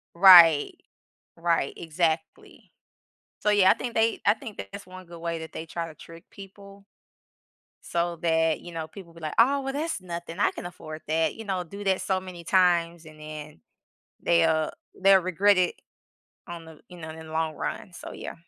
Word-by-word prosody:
Right, 170 -5 +8 0.6
right, 165 -4 0
exactly. 160 -1 -3 0.7
So 210 - 0
yeah, 200 -2 +5
I - - +5
think 240 -2 -6
they 225 0 +1
I - - +6
think 220 -1 -10
that's 200 -1 -9
1 185 0 -12
good 170 0 -12
way 165 -1 -3
that 160 - -8
they 160 - -7
try 165 0 -5
to 155 - -12
trick 165 +1 -13
people 200 0 -13 1.0
so 170 0 -1
that, 160 -1 +1
you 175 - -10
know, 160 -1 -5
people 175 -3 -13
be 165 - -14
like, 155 -1 -5
"Oh 275 +4 +4
well 270 0 -4
that's 305 - -3
nothing 170 0 -7
I - - +3
can - - -9
afford 155 -3 -9
that," 160 +1 +1
you 225 - -8
know, 190 -3 -2
do 200 +5 -9
that 190 -1 +1
so 190 -1 -1
many 180 -3 -10
times 175 -3 +2
and 155 -1 -14
then 155 0 -9 0.6
they'll 160 -2 +2 0.3
they'll 195 0 +6
regret 185 +2 +3
it 180 - +1 0.7
on 170 -2 -9
the, 160 -1 -13
you 180 -1 -12
know, 160 -1 -8
in 160 0 -10
the 155 - -10
long 160 -1 -1
run, 185 - -5
so - - -9
yeah. - - -7
170 Hz, 190 wpm, -26 LUFS, 160-195 Hz, 1.0 s, Right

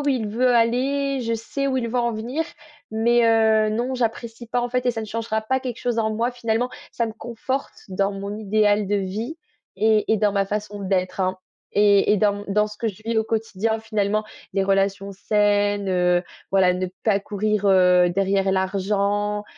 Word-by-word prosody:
où 285 - -1
il 255 -6 0
veut 250 +4 +2
aller, 265 +4 +1
je 230 -1 -1
sais 275 +5 -3
où 260 - 0
il 235 - -2
veut 245 +2 -1
en 235 -1 +1
venir, 245 +9 -3 0.5
mais 235 +2 +3
heu, 220 -1 +4
non 240 +4 -1
j'apprécie 235 -1 -3
pas 245 - 0
en 245 - -1
fait 250 +1 -1
et - - +4
ça 225 - -4
ne 220 - -6
changera 220 0 -2
pas 260 +4 0
quelque 250 -2 -5
chose 240 -2 -1
en 220 -1 0
moi 235 +3 0
finalement. 240 0 -1 0.2
Ça 235 - -1
me 220 - -5
conforte 240 +4 -4
dans 195 +1 0
mon 200 +1 -5
idéal 210 -1 +2
de 205 - +2
vie 205 - -3 0.4
et 220 0 +2
et - - +4
dans 205 0 +2
ma 200 -1 +1
façon 205 0 -4
d'être, 185 0 -1
hein 185 0 0 0.3
et 205 -1 +4
et - - +4
dans 205 0 +1
m - - -9
dans 210 +1 +2
ce 210 0 -10
que 230 - -1
je 205 -1 -8
vis 230 0 -1
au - - +3
quotidien 225 0 -1
finalement. 215 -1 -1 0.3
Des 195 -1 +2
relations 195 0 0
saines, 205 0 +1
heu, 180 -1 +2 0.3
voilà, 185 -2 +4
ne 185 +1 -2 0.2
pas 200 -3 +3
courir, 210 0 -1
heu, 180 -2 +5
derrière 195 +1 +1
l'argent. 200 +2 0
215 Hz, 200 wpm, -23 LUFS, 200-230 Hz, 0.5 s, heu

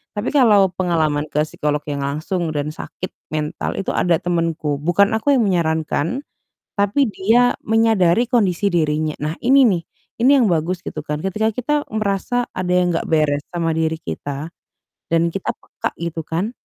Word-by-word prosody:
Tapi 205 +3 -2
kalau 210 -9 +5
pengalaman 160 -5 0
ke 150 0 0
psikolog 150 -1 -2
yang 140 - -3
langsung 160 +5 -2
dan 145 +1 -2
sakit 180 +3 -7 0.2
mental 150 -1 -3
itu 195 - -2
ada 175 -1 +2
temenku. 165 -4 -1
Bukan 175 +6 +3
aku 225 +6 +2
yang 245 - +3
menyarankan, 165 - 0 0.5
tapi 205 +6 +2
dia 230 +5 +2
menyadari 225 -1 +3
kondisi 205 -5 +2
dirinya. 155 -3 0
Nah, 150 +2 -3
ini 270 +2 +5
nih, 185 -7 +2 0.4
ini 255 +3 +5
yang 250 - +4
bagus, 175 -1 0
gitu 155 - -5
kan. 150 0 -3
Ketika 215 +3 0
kita 250 +6 -2 0.2
merasa 215 +3 -1
ada 185 -1 -3
yang 180 -1 +2
enggak 165 - -2
beres 150 -2 +2
sama 165 -2 -1
diri 160 0 0
kita 145 - -6 0.6
dan 165 0 +2
kita 195 +3 -3
peka - - -5
gitu 170 -1 -3
kan. 175 +7 -2
175 Hz, 160 wpm, -20 LUFS, 155-210 Hz, 0.6 s, kalau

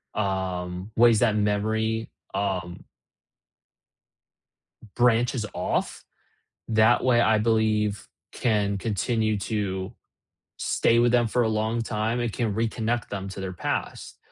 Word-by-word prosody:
um, 95 -1 -3
ways 115 -2 +6
that 110 -3 +3
memory, 110 +2 0 0.2
um 95 -3 -3 2.1
branches 120 -1 +2
off. 90 - -2 0.6
That 110 +2 +4
way, 120 -2 +4
I 110 -2 +4
believe, 110 -2 +1 0.3
can 105 -4 0
continue 110 +1 0
to 100 -1 -3 0.6
stay 115 - +2
with 120 0 +4
them 120 -1 +3
for 125 +2 +1
a 110 - +1
long 110 +2 0
time, 110 +2 -1
it 120 -3 -1
can 115 -4 -1
reconnect 115 +1 -1
them 100 -1 -4
to 95 - -8
their 95 -1 -4
past. 90 - -4
110 Hz, 115 wpm, -25 LUFS, 100-115 Hz, 2.1 s, ways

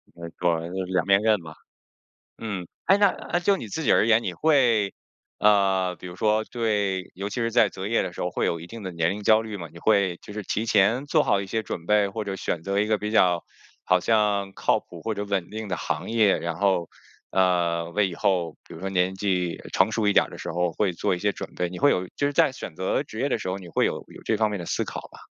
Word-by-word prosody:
没 85 -1 -8
错 90 -1 +2
儿， 80 +1 -5
就 95 - -1
两 90 -2 -1
面 100 0 +5
刃 110 -4 +2
吧。 80 -1 -10 0.8
嗯， 100 -6 -4 0.2
诶， 195 - +6
那 205 -2 +4 0.3
就 195 +3 +3
你 115 - -7
自 160 - -4
己 - - +3
而 - - +4
言， 115 0 +4
你 95 - -3
会， 120 - +2 0.4
呃， 95 -3 +3
比 - - -10
如 90 0 -9
说 110 +2 +2
对 105 -6 -1
尤 100 +2 -4
其 105 - -7
是 115 -1 0
在 115 -2 +4
择 95 0 -6
业 115 +2 +1
的 90 - -4
时 - - -9
候 90 - -1
会 - - -1
有 85 - -1
一 85 - -9
定 115 +4 -9
的 95 - -4
年 85 -1 0
龄 105 +2 -4
焦 110 +1 +5
虑 110 -2 -6
吗？ 85 -4 -7
你 85 - -12
会 100 -2 +2
就 - - -10
是 105 0 -5
提 105 +3 -2
前 110 +4 +3
做 155 +1 +3
好 100 - +2
一 100 - -5
些 110 +3 -2
准 85 -4 -6
备？ 105 -1 +3
或 105 +2 -4
者 100 - -3
选 85 -3 -3
择 100 +2 0
一 105 - +1
个 110 - +2
比 105 0 -4
较 90 -5 +3 0.4
好 90 0 +3
像 105 -2 +1
靠 - - +1
谱 - - -13
或 110 - -2
者 105 0 -3
稳 100 -4 -2
定 110 0 -6
的 90 - -2
行 80 +2 -3
业， 110 -4 +3
然 85 -1 -3
后， 95 -3 +1 0.4
呃， 85 -3 +1
为 100 +3 +1
以 90 - -7
后 90 -4 0
比 - - -13
如 80 - -10
说 95 - -3
年 95 0 +1
纪 90 -3 -1 0.2
成 95 +3 +3
熟 110 -1 0
一 100 - +4
点 - - +5
儿 - - -12
的 - - -10
时 - - -5
候 90 0 0
会 100 0 0
做 85 - 0
一 - - -4
些 105 +3 0
准 - - -8
备， 90 - -1
你 90 - -7
会 145 - +5
有 90 -6 0
就 145 - +1
是 145 - -1
在 160 0 +4
选 95 -10 -8
择 95 - 0
职 110 - -8
业 140 - +1
的 - - 0
时 - - -5
候， 95 - -2
你 90 -3 -11
会 - - +1
有 - - 0
有 - - -13
这 - - +1
方 110 -1 +1
面 105 - -3
的 85 - -6
思 - - -1
考 - - -6
吧？ - - -13
100 Hz, 290 characters per minute, -25 LUFS, 90-110 Hz, 0.8 s, 诶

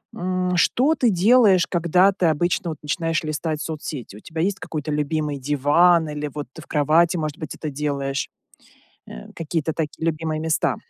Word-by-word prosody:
м, 180 0 -1
что 270 - +3
ты 250 -6 +2
делаешь, 195 -1 +4
когда 180 +3 +3
ты 185 -2 -1
обычно 170 +2 0
вот 155 - -7
начинаешь 165 +2 -1
листать 155 0 -3
соцсети? 150 -9 -6
У - - -11
тебя 160 +7 -5
есть 190 +2 0
какой-то 155 -1 -5
любимый 150 0 -1
диван 150 +5 +3
или 150 0 -4
вот 145 -3 -5
ты 160 - -10
в - - -14
кровати, 160 +4 +3
может 155 -3 -3
быть, 155 - -6
это 155 - -5
делаешь, 140 -1 -2 0.8
э, - - -10
какие-то 160 -1 -2
такие 160 0 -4
любимые 160 -1 -1
места? 160 -1 0
160 Hz, 170 wpm, -22 LUFS, 150-175 Hz, 0.8 s, делаешь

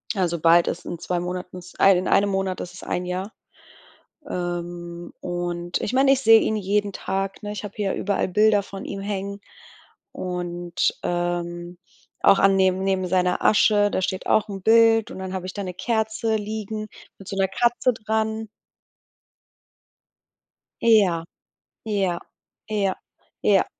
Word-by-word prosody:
also 175 -4 0
bald 170 +1 +5
ist 170 - -3
in 170 - -5
2 180 0 -2
Monaten, 180 +1 -5
in - - -8 0.2
ei 195 -2 +6
in 180 - -2
einem 200 0 +3
Monat 190 -1 -1
ist 180 - -7
es 185 - -11
1 180 - -2
Jahr. 185 +3 -4 1.0
Ähm, 175 -1 -5
und 175 -1 -3
ich 210 - -3
meine, 270 +1 +5
ich 270 0 +3
sehe 225 -3 +7
ihn 220 - 0
jeden 205 +1 0
Tag, 195 +1 -3
ne? 205 - -4
Ich 210 - -6
habe 205 -1 -7
hier 200 -2 -1
überall 200 -1 -1
Bilder 210 +2 +3
von 195 0 -8
ihm 200 - -5
hängen 200 0 -4 0.7
und, 175 -1 -2
ähm, 175 0 -3 0.5
auch 195 - +6
an 195 0 +5
neben 190 0 +2
neben 190 -1 0
seiner 180 0 +1
Asche, 205 -1 +4
da - - 0
steht 190 0 -2
auch 215 0 +2
'n 195 -1 -6
Bild 225 0 +5
und - - -8
dann 190 0 -5
habe 185 -1 -4
ich 185 - -6
da 205 - -4
'ne 180 -1 -5
Kerze 220 +2 -1
liegen 215 0 -5 0.3
mit 195 - -13
so - - -5
'ner 195 0 +3
Katze 240 +5 +2
dran. 220 0 -2 2.3
Ja, 200 -8 +4 0.6
ja, 195 -5 0 0.5
ja, 200 -3 0 0.5
ja. - - +4
195 Hz, 160 wpm, -23 LUFS, 180-210 Hz, 2.3 s, sehe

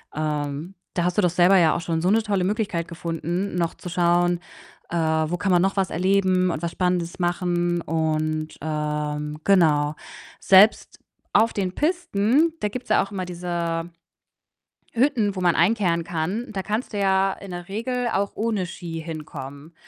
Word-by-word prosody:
Ähm, 150 +3 -3 0.2
da 175 - 0
hast 180 +2 -1
du - - +5
doch 180 - +3
selber 180 +3 +5
ja 165 -3 +4
auch 170 - -2
schon 165 -2 -2
so 180 - +2
'ne 220 +1 +3
tolle 200 -4 0
Möglichkeit 190 -4 -1
gefunden, 170 +3 -3
noch 170 -2 -1
zu 180 - -8
schauen, 175 0 +2 0.5
äh, 175 - -4
wo 160 +1 +1
kann 195 0 0
man 175 -1 +4
noch 195 +1 0
was 190 -2 +1
erleben 185 0 +2
und 155 - -4
was 170 - -1
Spannendes 180 -1 -1
machen? 175 -1 0
Und, 155 -1 -1
ähm, 150 -1 -3
genau, 155 -6 +3 0.4
selbst 195 +3 +5 0.4
auf 225 +2 +4
den 190 -2 -2
Pisten, 310 - +1
da 210 - +1
gibt's 245 +1 -7
ja 215 - +4
auch 200 - -10
immer 185 -2 -3
diese 170 -1 -3 1.0
Hütten, 230 -5 +1
wo 185 - -3
man 175 -1 +3
einkehren 170 -2 +2
kann, 180 +10 -3
da 190 -2 -4
kannst 215 +2 -3
du 205 - -2
ja 195 0 +2
in 195 -2 -10
der 175 +1 -7
Regel 245 +4 -2
auch 200 +1 0
ohne 215 -4 -1
Ski 170 -2 -6
hinkommen. 150 -1 -8
175 Hz, 170 wpm, -23 LUFS, 165-200 Hz, 1.0 s, du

